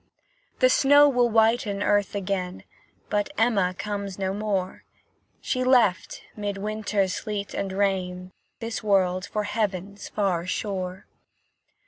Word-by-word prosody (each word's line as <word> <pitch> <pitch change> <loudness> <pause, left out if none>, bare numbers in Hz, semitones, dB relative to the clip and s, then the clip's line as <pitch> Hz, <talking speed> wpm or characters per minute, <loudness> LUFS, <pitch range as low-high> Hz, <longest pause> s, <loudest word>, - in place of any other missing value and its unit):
The 255 - +6
snow 285 +2 +6
will 245 -3 +3
whiten 220 -2 +2
earth 205 -1 +1
again, 190 -2 -3 0.5
But 205 +3 0
Emma 200 -6 +2
comes 200 -1 -4
no 190 -1 -1
more; 200 -3 -2 0.6
She 255 -1 -1
left, 240 -8 +2
'mid 205 -2 -3
winter's 205 -2 -1
sleet 205 -2 -4
and 195 -1 -3
rain, 185 -2 -1 0.3
This 225 0 -4
world 185 -3 +1
for 210 - -2
Heaven's 205 -2 -3
far 185 -4 -1
shore. 185 -1 -3
200 Hz, 120 wpm, -25 LUFS, 190-215 Hz, 0.6 s, The